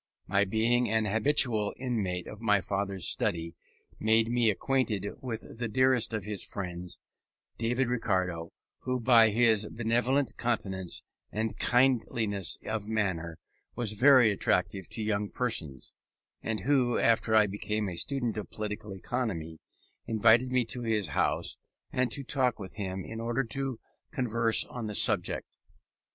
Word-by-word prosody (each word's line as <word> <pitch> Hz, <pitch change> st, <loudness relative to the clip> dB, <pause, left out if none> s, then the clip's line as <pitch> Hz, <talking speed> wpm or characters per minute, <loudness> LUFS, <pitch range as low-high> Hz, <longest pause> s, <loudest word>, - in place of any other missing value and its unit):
My 100 Hz, +1 st, +2 dB
being 115 Hz, +4 st, +1 dB
an 110 Hz, 0 st, +1 dB
habitual 110 Hz, -1 st, +2 dB
inmate 100 Hz, -9 st, -2 dB
of 105 Hz, -, -10 dB
my 105 Hz, -3 st, +3 dB
father's 95 Hz, -1 st, -3 dB
study 85 Hz, -5 st, -1 dB, 0.5 s
made 110 Hz, +1 st, +3 dB
me 120 Hz, -2 st, +3 dB
acquainted 110 Hz, -2 st, 0 dB
with 115 Hz, -2 st, -6 dB
the 120 Hz, -, -1 dB
dearest 125 Hz, 0 st, +2 dB
of 110 Hz, -3 st, -2 dB
his 105 Hz, -1 st, -3 dB
friends, 90 Hz, -2 st, -6 dB, 0.6 s
David 120 Hz, +3 st, +1 dB
Ricardo, 95 Hz, -8 st, -1 dB, 0.3 s
who 130 Hz, 0 st, -2 dB
by 115 Hz, -2 st, +6 dB
his 110 Hz, -1 st, +3 dB
benevolent 120 Hz, +4 st, 0 dB
countenance, 95 Hz, -6 st, -2 dB, 0.3 s
and 110 Hz, +1 st, -3 dB
kindliness 115 Hz, -, +1 dB
of 105 Hz, -2 st, -3 dB
manner, 95 Hz, -7 st, -2 dB, 0.4 s
was 115 Hz, -3 st, -1 dB
very 125 Hz, 0 st, +6 dB
attractive 95 Hz, -2 st, 0 dB
to 110 Hz, -, -3 dB
young 105 Hz, -1 st, -1 dB
persons, 85 Hz, -, -3 dB, 0.5 s
and 110 Hz, -1 st, -3 dB
who, 130 Hz, -3 st, +2 dB
after 115 Hz, -1 st, +2 dB
I 110 Hz, -1 st, +6 dB
became 105 Hz, +1 st, -2 dB
a 90 Hz, -, -4 dB
student 120 Hz, +3 st, -1 dB
of 105 Hz, -5 st, -5 dB
political 105 Hz, -1 st, -5 dB
economy, 90 Hz, -8 st, -3 dB, 0.5 s
invited 115 Hz, +3 st, +4 dB
me 125 Hz, -2 st, +2 dB
to 115 Hz, +2 st, -5 dB
his 110 Hz, -4 st, 0 dB
house -, -, 0 dB, 0.3 s
and 130 Hz, -1 st, +1 dB
to 140 Hz, +2 st, -4 dB
walk 125 Hz, -3 st, +2 dB
with 95 Hz, -3 st, -8 dB
him 95 Hz, -2 st, -4 dB
in 115 Hz, 0 st, -6 dB
order 120 Hz, +3 st, 0 dB
to 135 Hz, 0 st, -3 dB, 0.3 s
converse 115 Hz, -2 st, +2 dB
on 120 Hz, -3 st, -6 dB
the 105 Hz, -, -4 dB
subject. 105 Hz, -6 st, +2 dB
110 Hz, 140 wpm, -29 LUFS, 100-120 Hz, 0.6 s, by